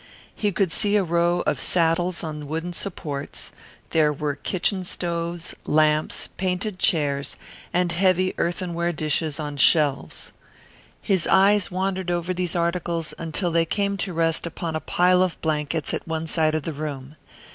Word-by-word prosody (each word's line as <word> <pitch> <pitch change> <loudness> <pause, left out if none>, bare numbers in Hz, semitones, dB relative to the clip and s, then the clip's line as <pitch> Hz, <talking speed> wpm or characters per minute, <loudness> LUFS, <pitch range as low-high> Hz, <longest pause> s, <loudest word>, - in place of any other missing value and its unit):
He 205 -1 0
could 190 -2 +1
see 205 +2 +1
a 205 - +4
row 170 0 +2
of - - 0
saddles 175 +1 +1
on 150 -2 -5
wooden 165 +4 -3
supports; 150 -7 -4 0.4
there 155 -2 +4
were 150 0 -2
kitchen 185 +5 -1
stoves, 170 -1 -3
lamps, 155 0 +2
painted 185 +1 -2
chairs, 145 -5 +1 0.4
and 180 -1 +1
heavy 185 +1 +2
earthenware 170 0 -1
dishes 155 0 -1
on 145 -1 -4
shelves. 145 0 +2 0.7
His 190 -5 +2
eyes 200 0 +4
wandered 190 0 -2
over 175 +1 -1
these 180 -2 -2
articles 170 -1 -1
until 170 +2 -1
they 165 0 +3
came 200 +2 0
to 190 0 -1
rest 165 0 0
upon 165 -1 -4
a - - 0
pile 180 +3 +3
of 185 -2 0
blankets 155 0 -1
at - - -4
one 160 0 -2
side 160 -1 +2
of 155 - -1
the 165 - -3
room. 145 -1 -6
170 Hz, 155 wpm, -24 LUFS, 155-180 Hz, 0.7 s, a